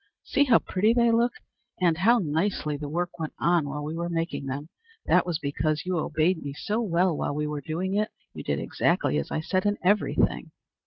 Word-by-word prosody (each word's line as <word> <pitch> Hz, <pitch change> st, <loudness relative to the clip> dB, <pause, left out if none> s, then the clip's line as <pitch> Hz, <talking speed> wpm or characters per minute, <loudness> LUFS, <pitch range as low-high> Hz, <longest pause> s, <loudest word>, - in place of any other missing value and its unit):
"See 285 Hz, 0 st, +2 dB
how 250 Hz, -4 st, +6 dB
pretty 210 Hz, +5 st, +1 dB
they 235 Hz, -1 st, +4 dB
look! 235 Hz, +1 st, +2 dB, 0.5 s
And 170 Hz, -3 st, +2 dB
how 230 Hz, +6 st, +5 dB
nicely 160 Hz, -3 st, -1 dB
the 145 Hz, 0 st, -5 dB
work 175 Hz, +3 st, -3 dB
went 160 Hz, -2 st, -4 dB
on 170 Hz, -4 st, +2 dB
while 150 Hz, +1 st, -4 dB
we 150 Hz, +2 st, -4 dB
were 170 Hz, +1 st, -3 dB
making 165 Hz, -4 st, -2 dB
them! 140 Hz, +3 st, -4 dB, 0.4 s
That -, -, +3 dB
was 170 Hz, -3 st, 0 dB
because 155 Hz, +1 st, -1 dB
you 180 Hz, -2 st, 0 dB
obeyed 160 Hz, +3 st, +1 dB
me 140 Hz, -1 st, -5 dB
so 210 Hz, +10 st, -2 dB
well 180 Hz, -4 st, +2 dB
while 145 Hz, -, -2 dB
we 150 Hz, 0 st, -1 dB
were 150 Hz, -1 st, -3 dB
doing 170 Hz, +6 st, -3 dB
it. 210 Hz, +1 st, +1 dB, 0.2 s
You -, -, -7 dB
did -, -, -1 dB
exactly 75 Hz, -, +1 dB
as 70 Hz, -, -4 dB
I 155 Hz, -, -2 dB
said 185 Hz, +4 st, 0 dB
in 205 Hz, -, +1 dB
every 205 Hz, +3 st, +2 dB
thing." -, -, +1 dB
170 Hz, 215 wpm, -26 LUFS, 150-195 Hz, 0.5 s, how